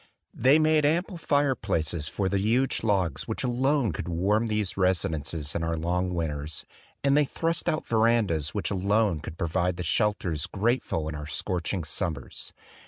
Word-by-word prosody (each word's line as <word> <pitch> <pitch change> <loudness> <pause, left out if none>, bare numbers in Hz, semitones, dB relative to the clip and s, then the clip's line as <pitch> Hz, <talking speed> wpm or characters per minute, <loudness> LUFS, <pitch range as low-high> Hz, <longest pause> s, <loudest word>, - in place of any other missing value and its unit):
They 130 +5 +5
made 155 -1 +3
am 160 +5 +3
ple 190 -1 -10
fireplaces 105 - 0
for 100 - -1
the 100 +1 +1
huge 120 +6 +1
logs 95 -10 0
which 110 - -3
alone 130 -1 +1
could 80 - -5
warm 100 +7 +1
these 105 -3 -1
residences 80 -5 0
in 85 - -2
our 85 0 -1
long 90 +2 -1
winters; 75 -2 -3 0.4
and 140 0 +4
they 150 0 +5
thrust 165 +4 -1
out 155 - -1
verandas 110 -10 +2
which 105 - -1
alone 100 -2 +2
could 80 +1 -8
pro - - -1
vide 90 +1 0
the 90 - -3
shelters 90 -7 0
grateful 100 -6 0
in 80 - -4
our 75 0 -6
scorching 90 +3 -2
sum 85 +2 -1
mers. 70 - -8
95 Hz, 170 wpm, -27 LUFS, 80-120 Hz, 0.4 s, They